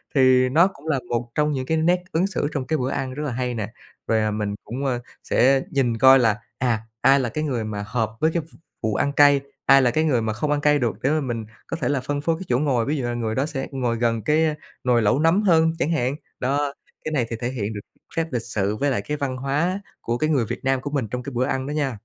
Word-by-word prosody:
thì 130 -1 +5
nó 165 +7 +5
cũng 160 -5 -12
là 140 -4 +1
một 120 0 -2
trong 150 0 +2
những 130 -2 -2
cái 160 +4 0
nét 175 +3 +2
ứng 175 +4 +2
xử 180 -6 -1
trong 135 -3 -3
cái 155 - +1
bữa 130 -1 -1
ăn 130 -1 -3
rất 150 +2 -4
là 140 - -2
hay 125 0 -2
nè. 110 0 -4 0.3
Rồi, 110 - +2
à, 110 0 0
mình 105 -1 -2
cũng, 130 +6 -5
ơ, 125 -2 0 0.2
sẽ 135 +2 +3
nhìn 125 -4 +1
coi 130 +3 +7
là, 110 -3 +3 0.2
à, 120 -4 0 0.2
ai 135 +1 +5
là 125 -3 -1
cái 155 +6 -3
người 125 -7 -1
mà 105 -1 -4
hợp 110 -2 -1
với 160 +1 +2
cái 170 - 0
v 160 - -20 0.3
vụ 110 -1 0
ăn 140 - +1
cay, 145 -1 +6 0.2
ai 135 0 +7
là 125 - +3
cái 155 +6 +1
người 130 -7 +2
mà 110 -1 -1
không 145 +7 -2
ăn 145 - +1
cay 150 0 +4
được 120 -3 -2
để 135 - +1
mà 155 0 +1
mình 115 -4 -3 0.2
có - - -3
thể - - +1
là 140 -3 0
phân 145 +2 -3
phối 165 +2 +1
cái - - -5
chỗ 120 - +3
ngồi, 130 -6 +1
ví 150 +2 -1
dụ 135 - -2
là 120 - -2
người 110 -2 -2
đó 135 - +1
sẽ 145 -4 -4
ngồi 125 -3 -1
gần 115 -1 0
cái, 155 +4 +3
ơ, 155 - +1 0.3
nồi 120 -2 +3
lẩu 105 +6 +2
nấm 165 +6 +3
hơn 165 -5 +4
chẳng 160 - +1
hạn. 140 -3 0 0.2
Đó, 140 +2 0 0.3
cái 155 - -2
này 135 -6 +1
thì 115 - -3
thể 120 - -1
hiện 110 -4 -3
được 105 - -5 0.4
phép 165 0 0
lịch 120 - -1
sự 105 -2 -2
với 140 +6 0
lại 110 -6 0
cái 150 +8 -4
văn 135 -3 -2
hóa 150 +9 0 0.2
của 120 +1 -1
cái 155 +4 0
người 130 -7 +2
Việt 120 +4 -6
Nam 135 -1 +1
của 145 - -4
mình 135 -6 -1
trong 125 +3 -4
cái 140 - -6
bữa 125 +1 +1
ăn 135 0 -2
đó 145 - -3
nha. 140 -6 -1
130 Hz, 285 wpm, -23 LUFS, 120-150 Hz, 0.4 s, coi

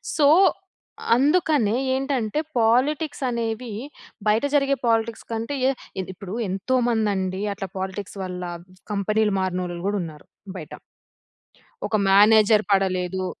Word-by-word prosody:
So, 300 - +3 0.9
అందుకనే 285 - +2 0.2
ఏంటంటే 265 -3 -1 0.2
politics 270 +7 +1
అనేవి, 230 -1 -3 0.5
బయట 215 +3 +3
జరిగే 275 -1 +3
పాలిటిక్స్ 225 0 0
కంటే 230 +5 -3 0.5
ఏదిప్పుడు 190 +1 -8 0.2
ఎంతో 195 +8 -1
మంది 220 -3 +1
అండి 190 0 -2
అట్లా 195 -1 -6
పాలిటిక్స్ 190 +1 -5
వల్ల 180 -1 -5 0.5
కంపెనీలు 210 +1 +1
మారినోళ్ళు 180 -2 -2
కూడా 205 +1 0
ఉన్నారు 155 -3 -10 0.3
బయట. 155 -4 -9 1.2
ఒక - - -1
మ్యానేజర్ 210 +2 +6
పడలేదు. 185 -1 +1
215 Hz, 105 wpm, -23 LUFS, 190-235 Hz, 1.2 s, మ్యానేజర్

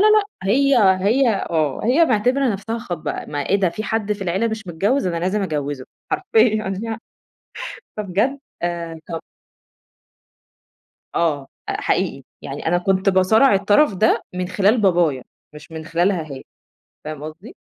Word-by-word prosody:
لأ، 430 0 +6 0.2
هي 275 +7 +3 0.3
هي 245 +5 +4 0.2
آه، 155 -5 0
هي 265 +9 +5
معتبرة 250 +2 +2
نفسها 220 +2 -3
خاطبة. 175 -7 -4
ما 145 -1 -4
إيه 200 - +4
ده؟ 190 - +3
في 215 - -5
حد 215 -2 -1
في 205 -1 -5
العيلة 190 +6 0
مش 220 -2 -5
متجوز، 195 +8 0
أنا 170 - -1
لازم 185 +4 0
أجوّزه 145 -6 -3 0.3
حرفيًا 220 - +2
يعني. 225 -1 -4 1.0
فبجد 210 +7 0 0.2
آآ 170 -2 -3
ط– 165 -2 -4 1.9
آه، 150 -5 0 0.2
حقيقي - - -1 0.2
يعني - - -6
أنا 175 +2 +3
كنت 190 +2 +1
باصارع 200 +6 +5
الطرف 205 +6 +3
ده 215 +4 +2
من 180 0 -2
خلال 205 +5 +3
بابايا 170 -9 +2 0.3
مش 150 +2 -12
من 160 0 -6
خلالها 170 +2 +1
هي، 135 - -8 0.6
فاهم 150 -1 -6
قصدي؟ 165 +8 -10
195 Hz, 140 wpm, -21 LUFS, 170-225 Hz, 1.9 s, لأ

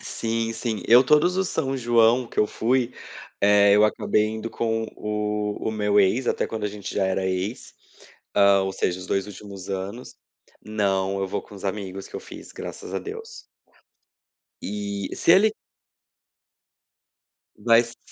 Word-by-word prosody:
Sim, 115 0 -2
sim. 115 -1 -3
Eu, 120 +3 +7
todos 150 +6 +4
os 190 -1 0
São 135 -2 -1
João 120 0 +3
que - - -10
eu 105 - +4
fui, 125 +3 0 0.5
eh, 100 0 +5
eu 105 +1 +6
acabei 105 0 +1
indo 110 +1 -4
com 115 0 -1
o 105 0 -2 0.3
o - - -2
meu 105 -1 +1
ex, 105 +6 +3
até - - 0
quando 110 -2 -5
a - - 0
gente 105 -1 -7
já 100 - +1
era 95 0 0
ex, 95 +5 -3 0.6
ah, 100 -1 +5
ou 95 0 -2
seja, 90 -1 -1
os 90 - -9
2 95 0 -1
últimos 100 -2 -10
anos. 100 +6 -5 0.5
Não, 100 -2 0
eu 95 - -1
vou - - -3
com - - -15
os 100 - -11
amigos 95 -1 -4
que - - -20
eu - - -6
fiz, - - -12
graças - - -8
a - - 0
Deus. 450 +2 -8 1.2
E, 100 -1 -4
se 170 - +4
ele 210 +3 +5 2.0
Mas 115 0 +3
105 Hz, 160 wpm, -24 LUFS, 100-115 Hz, 2.0 s, Eu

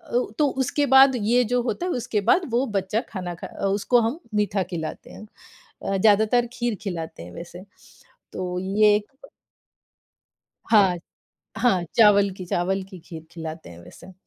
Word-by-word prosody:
ओ 245 - +1
तो 295 - +4 0.2
उसके 290 +3 0
बाद 265 -1 +7
ये 240 +3 +2
जो 245 0 +1
होता 300 +8 -3
है, 365 - -1
उसके 220 -3 -2
बाद 365 - +5
वो 245 +3 +1
बच्चा 195 +4 0
खाना, 180 -4 -5
खा - - -5 0.2
उसको 205 +5 +2
हम 235 +9 -2 0.2
मीठा 205 -2 +1
खिलाते 160 -2 -6
हैं। 215 - -11 0.6
अ, 195 0 -1
ज़्यादातर 220 +4 +3
खीर 240 -3 -2
खिलाते 165 - -6
हैं 90 - -11
वैसे। 175 +2 -10 0.7
तो 180 -1 -4
ये 205 +2 +3
एक 210 +4 -4 1.6
हाँ। 195 -5 +5 0.6
हाँ 220 -7 +2
चावल 200 -3 +5
की 185 - -7
चावल 190 +3 -1
की 185 - -10
खीर 160 -2 -11
खिलाते 160 - -8
हैं 85 - -12
वैसे। 190 - -14
205 Hz, 160 wpm, -23 LUFS, 180-235 Hz, 1.6 s, बाद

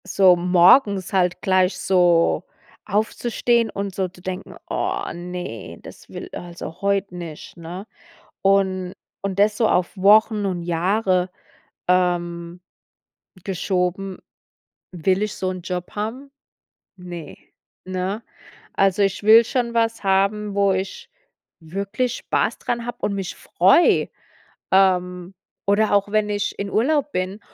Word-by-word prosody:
So 190 -2 +5
morgens 185 +4 +4
halt 180 -1 +1
gleich 185 0 +2
so 175 -3 +3 0.4
aufzustehen 230 +2 0
und 200 -1 -4
so 190 0 -1
zu 180 0 -17
denken: 185 +1 -6
„Oh - - -1
ne, 175 -9 -7
das - - -13
will - - -8
also 175 -1 -8
heut 200 -1 0
nicht”, 170 -4 -9
ne? 175 +4 -8 0.6
Und 190 -2 +1 0.3
und 195 -1 -3
das 205 +1 +4
so 225 - +3
auf 180 +2 +1
Wochen 210 +2 +4
und 180 -2 -3
Jahre, 185 +2 +1 0.6
ähm, 175 -1 0 0.8
geschoben. 185 0 -2 0.7
Will 185 +3 0
ich 210 - -3
so 185 - -2
'n 185 -1 -6
Job 180 0 -5
haben? 230 +7 -4 0.7
Ne, 175 -3 -8 0.5
ne? 185 +4 -3 0.5
Also 195 0 +2
ich 195 +1 -1
will 220 +2 +8
schon 240 -1 -1
was 230 -1 0
haben, 200 +2 +1
wo 200 -1 +3
ich 195 - -4 0.5
wirklich 200 +9 -3
Spaß - - -1
dran 235 -1 -3
hab 240 - -7
und 200 - 0
mich 195 -3 -4
freu. 195 - +3 0.7
Ähm, 180 -1 +2 0.3
oder 205 +1 +3
auch 200 0 +2
wenn 215 0 +1
ich 205 0 -2
in 200 0 -3
Urlaub 285 +6 +1
bin 185 +3 -3
190 Hz, 130 wpm, -22 LUFS, 180-205 Hz, 0.8 s, will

